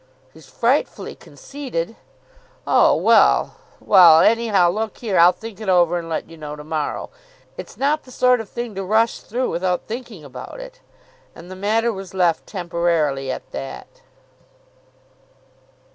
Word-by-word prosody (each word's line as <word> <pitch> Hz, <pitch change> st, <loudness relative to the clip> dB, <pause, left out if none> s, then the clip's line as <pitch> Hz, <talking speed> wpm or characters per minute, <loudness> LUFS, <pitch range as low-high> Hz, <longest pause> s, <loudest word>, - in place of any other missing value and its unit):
"He's 160 Hz, -3 st, -17 dB
frightfully 250 Hz, +5 st, -1 dB
conceited." 245 Hz, -9 st, -7 dB, 0.7 s
"Oh, -, -, +4 dB
well -, -, +3 dB, 0.2 s
Well, 170 Hz, -5 st, +7 dB
anyhow, 215 Hz, -6 st, +3 dB
look 215 Hz, +2 st, -4 dB
here, 210 Hz, -7 st, -1 dB
I'll 175 Hz, +1 st, +7 dB
think 220 Hz, +3 st, -11 dB
it 215 Hz, -, -4 dB
over, 175 Hz, -1 st, +3 dB
and 165 Hz, -1 st, -8 dB
let 160 Hz, -, -3 dB
you 165 Hz, -, -14 dB
know 150 Hz, -1 st, -7 dB
to 150 Hz, -, -10 dB
morrow. 155 Hz, -1 st, -4 dB, 0.4 s
It's -, -, -10 dB
not 295 Hz, +3 st, +1 dB
the -, -, -18 dB
sort 250 Hz, -1 st, +2 dB
of 215 Hz, -, -11 dB
thing 235 Hz, -2 st, -6 dB
to 195 Hz, 0 st, -5 dB
rush 220 Hz, +4 st, +1 dB
through 250 Hz, +3 st, -3 dB
without 180 Hz, +1 st, -1 dB
thinking 225 Hz, -, -8 dB
about 130 Hz, -, -10 dB
it." -, -, -11 dB, 0.6 s
And 175 Hz, +2 st, -12 dB
the -, -, -7 dB
matter 220 Hz, +4 st, 0 dB
was 190 Hz, -1 st, -9 dB
left 175 Hz, -3 st, +1 dB
temporarily 170 Hz, -7 st, -1 dB
at -, -, -8 dB
that. 65 Hz, -1 st, -8 dB
185 Hz, 150 wpm, -20 LUFS, 165-230 Hz, 0.7 s, Well